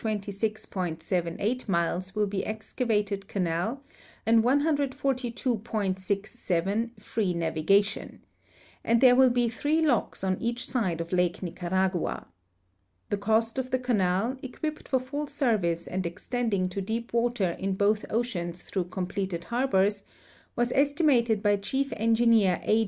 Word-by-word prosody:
78 200 -1 -2
miles 180 +2 0
will 210 0 +2
be 195 -1 -2
excavated 215 -2 -2
canal 190 +8 -1 0.4
and 225 0 +5
142.67 235 - -1
free 205 -3 -1
navigation, 170 +5 +1 0.6
and 230 0 +3
there 250 0 +7
will 260 0 +6
be 240 -1 +2
three 295 +8 +1
locks 245 -8 0
on 185 -1 0
each 235 +1 -1
side 190 -10 -1
of 165 - -6
Lake 180 0 +1
Nicaragua. 185 +1 -1 0.9
The 205 - +1
cost 225 +4 +1
of 255 -1 -3
the 255 - +2
canal, 225 -1 +1
equipped 305 +4 -5
for 260 - +2
full 285 +4 -4
service 210 - 0
and 185 +1 -3
extending 200 +2 -1
to 195 +2 -4
deep 230 +5 -4
water 235 -6 +1
in 195 0 -1
both 205 +2 +2
oceans 180 -7 -2
through 185 -3 -2
completed 185 -1 -3
harbors, 205 -5 +1 0.5
was 240 0 +1
esti 285 +5 +2
mated 235 -7 +3
by 205 -1 +4
Chief 270 +8 -1
Engineer 225 -4 +3
A. 215 - +3
215 Hz, 130 wpm, -28 LUFS, 190-245 Hz, 0.9 s, there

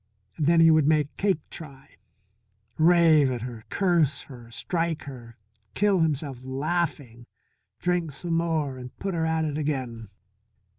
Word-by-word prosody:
Then 165 +2 +4
he 165 0 +7
would 155 -2 +4
make 150 -2 +2
Cake 190 -6 0
try, 140 -4 -9 0.8
rave 160 -3 +5
at 120 -3 -3
her, 120 -3 -7
curse 170 -8 +1
her, 120 -4 -13
strike 165 +5 -2
her, 120 -5 -10 0.4
kill 200 -2 +3
himself 145 -5 -1
laughing, 135 -3 -3 0.5
drink 175 -3 0
some 165 +5 -4
more 160 -5 0
and 125 0 -10
put 195 -1 -3
her 160 -1 0
at 160 0 0
it 150 0 -2
again. 130 -7 -3
155 Hz, 140 wpm, -26 LUFS, 130-165 Hz, 0.8 s, he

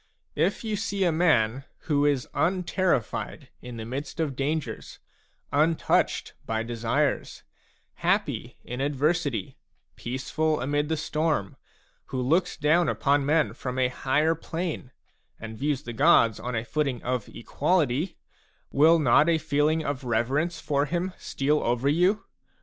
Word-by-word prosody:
If 170 +9 0
you 215 -2 -2
see 200 -2 -1
a 175 - +3
man 135 -7 +2 0.2
who 145 -3 +1
is 140 -4 0
unterrified 180 - -1
in 125 -1 -8
the 110 - -6
midst 135 +7 -6
of 150 -5 -1
dangers, 145 +3 -3 0.6
untouched 155 +3 +1
by 110 0 -2
desires, 115 -1 -1 0.5
happy - - -1
in 125 +2 -5
adversity, 145 - -1 0.4
peaceful 150 +5 -1
amid 145 +4 -1
the 160 - 0
storm, 150 - -1 0.5
who 130 - -4
looks 165 +8 +1
down 160 +3 +3
upon 140 -1 +1
men 155 0 +2
from 125 0 -5
a 130 -1 +2
higher 145 +5 +1
plane, 165 -3 -4 0.5
and 110 -1 -8
views 145 0 -1
the 120 - -6
gods 115 -5 +4
on 125 0 -4
a 110 +1 -2
footing 135 -3 -1
of 125 -3 -2
equality, 150 +4 0 0.5
will 160 +4 +5
not 150 +2 +4
a 165 - +4
feeling 155 +1 +1
of 140 -2 -3
reverence 130 +8 0
for 145 -2 0
him 175 +4 -2
steal 150 +2 0
over 120 +3 0
you 180 +7 +2
145 Hz, 140 wpm, -26 LUFS, 125-160 Hz, 0.6 s, will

